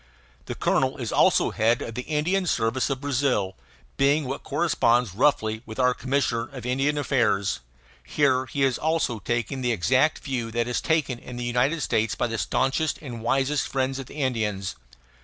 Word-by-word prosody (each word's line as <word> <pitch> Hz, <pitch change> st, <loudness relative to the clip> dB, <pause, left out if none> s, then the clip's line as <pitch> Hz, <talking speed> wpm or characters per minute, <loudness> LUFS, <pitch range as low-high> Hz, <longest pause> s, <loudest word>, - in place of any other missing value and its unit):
The -, -, -4 dB
colonel -, -, +1 dB
is -, -, -4 dB
also -, -, +3 dB
head 115 Hz, +2 st, +1 dB
of 115 Hz, -, -6 dB
the 125 Hz, -, -3 dB
Indian 165 Hz, +7 st, 0 dB
service 115 Hz, 0 st, +1 dB
of 135 Hz, -1 st, -2 dB
Brazil, 130 Hz, -9 st, 0 dB, 0.4 s
being 140 Hz, +2 st, +3 dB
what 135 Hz, +2 st, -4 dB
corresponds 120 Hz, -, +1 dB
roughly 110 Hz, -2 st, +1 dB
with 110 Hz, -, -8 dB
our 125 Hz, -1 st, +3 dB
commissioner 130 Hz, -3 st, -1 dB
of 130 Hz, -3 st, -8 dB
Indian 135 Hz, +4 st, +1 dB
affairs. 115 Hz, -8 st, +1 dB, 0.4 s
Here 130 Hz, -, +1 dB, 0.3 s
also 160 Hz, -5 st, +1 dB
he -, -, -5 dB
is -, -, -15 dB
taking 120 Hz, +3 st, -2 dB
the 125 Hz, -1 st, +1 dB
exact 130 Hz, -, +2 dB
view 125 Hz, -5 st, -3 dB
that 120 Hz, 0 st, 0 dB
is 125 Hz, -, -1 dB
taken 145 Hz, -7 st, 0 dB
in 125 Hz, -, -9 dB
the 120 Hz, -, -4 dB
United 125 Hz, +7 st, +1 dB
States 110 Hz, -5 st, 0 dB
by -, -, 0 dB
the 115 Hz, -2 st, -3 dB
staunchest 135 Hz, -, 0 dB
and 120 Hz, -6 st, -7 dB
wisest 135 Hz, +4 st, +1 dB
friends 135 Hz, 0 st, -1 dB
of 135 Hz, -, -7 dB
the -, -, -12 dB
Indians. 110 Hz, -9 st, -1 dB
130 Hz, 175 wpm, -25 LUFS, 115-140 Hz, 0.4 s, also